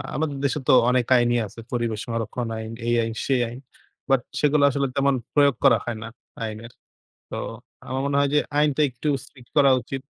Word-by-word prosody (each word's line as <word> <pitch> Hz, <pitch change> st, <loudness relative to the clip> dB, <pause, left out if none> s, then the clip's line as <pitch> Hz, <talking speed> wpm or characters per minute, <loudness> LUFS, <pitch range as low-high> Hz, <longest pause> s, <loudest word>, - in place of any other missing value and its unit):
আমাদের 150 Hz, -2 st, -1 dB
দেশে 140 Hz, +2 st, 0 dB
তো -, -, +7 dB, 0.2 s
অনেক 125 Hz, -2 st, +2 dB
আইনই 120 Hz, 0 st, +2 dB
আছে। 105 Hz, +4 st, -13 dB
পরিবেশ 115 Hz, -3 st, -1 dB
সংরক্ষণ 115 Hz, 0 st, -3 dB
আইন, 110 Hz, 0 st, -6 dB, 0.2 s
এই 120 Hz, -, +2 dB
আইন, 115 Hz, 0 st, -3 dB
সেই 130 Hz, -2 st, +2 dB
আইন। 120 Hz, -, -9 dB, 0.5 s
but 135 Hz, -2 st, +4 dB, 0.2 s
সেগুলা 150 Hz, -1 st, +4 dB
আসলে 140 Hz, +1 st, 0 dB
তেমন 140 Hz, 0 st, +2 dB, 0.2 s
প্রয়োগ 140 Hz, -3 st, +4 dB
করা 130 Hz, -4 st, +6 dB
হয় 120 Hz, -2 st, -3 dB
না -, -, -6 dB, 0.4 s
আইনের। 110 Hz, +1 st, -6 dB, 0.6 s
তো -, -, -4 dB, 0.5 s
আমার 130 Hz, +1 st, -2 dB
মনে 140 Hz, 0 st, 0 dB
হয় 140 Hz, 0 st, +2 dB
যে, -, -, +6 dB, 0.2 s
আইনটা 150 Hz, 0 st, +2 dB
একটু 125 Hz, +4 st, -4 dB
strict 125 Hz, -4 st, -17 dB
করা 140 Hz, -2 st, +6 dB
উচিত। 135 Hz, +3 st, -6 dB
130 Hz, 190 wpm, -24 LUFS, 115-140 Hz, 0.6 s, তো